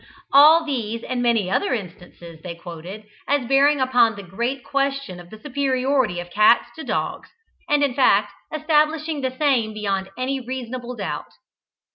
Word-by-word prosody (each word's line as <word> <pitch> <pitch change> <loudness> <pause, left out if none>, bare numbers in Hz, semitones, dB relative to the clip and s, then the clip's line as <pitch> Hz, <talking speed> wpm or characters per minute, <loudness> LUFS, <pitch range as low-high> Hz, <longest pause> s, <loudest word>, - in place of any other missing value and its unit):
All 310 +4 +7
these, 230 -6 -3
and 250 -1 -3
many 230 -6 +1
other 400 - +1
instances, 175 -4 -10
they 170 -1 -7
quoted, 175 +4 -9 0.2
as 280 -4 0
bearing 280 +2 +4
upon 245 -4 +3
the 200 - -9
great 235 +8 -3
question 275 -9 -2
of 175 0 -13
the 220 - -11
superiority 265 -6 0
of 175 0 -8
cats 215 +4 +4
to 320 - -7
dogs, - - -3 0.4
and 295 0 +3
in 280 -3 +1
fact, 205 -6 +3 0.2
establishing 310 0 0
the 260 - 0
same 250 -7 +1
beyond 195 -2 -2
any 265 +2 -2
reasonable 250 -1 -6
doubt. - - -5
250 Hz, 155 wpm, -22 LUFS, 205-280 Hz, 0.4 s, All